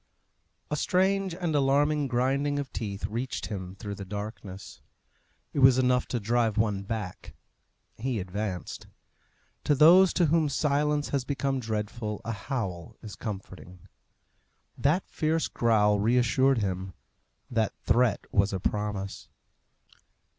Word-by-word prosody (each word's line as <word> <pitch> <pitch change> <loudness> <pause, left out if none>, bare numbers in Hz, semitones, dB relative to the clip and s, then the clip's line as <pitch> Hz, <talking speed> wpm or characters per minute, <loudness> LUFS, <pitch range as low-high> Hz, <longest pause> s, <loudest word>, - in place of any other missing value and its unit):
A - - +1
strange 190 +3 +1
and 175 -3 -2
alarming 145 +1 +2
grinding 135 +3 0
of 140 -3 -4
teeth 100 -3 -4
reached 120 +4 -3
him 95 -2 -6
through 100 0 -6
the 100 - -7
darkness. 105 -1 -7 0.7
It - - -1
was 130 -1 +7
enough 125 -1 +2
to 120 - -2
drive 115 0 +1
one 105 -3 +1
back: 100 -2 -6 0.6
he 125 -1 -1
advanced. 95 -1 -5 0.8
To 145 - +3
those 175 +6 +7
to 175 - +3
whom 160 -1 +2
silence 145 +1 +1
has 140 -3 0
become 135 0 -1
dreadful 110 -1 -3
a 115 - -2
howl 100 - -4
is 105 -3 -8
comforting. 95 -4 -8 0.9
That 155 +7 +1
fierce 160 +1 0
growl 105 -3 +2
reassured 125 +4 +3
him; 95 -3 -2 0.6
that 110 -3 0
threat 120 -2 +2
was 100 0 +3
a 95 - -1
promise. 105 0 -3
120 Hz, 125 wpm, -28 LUFS, 105-140 Hz, 0.9 s, was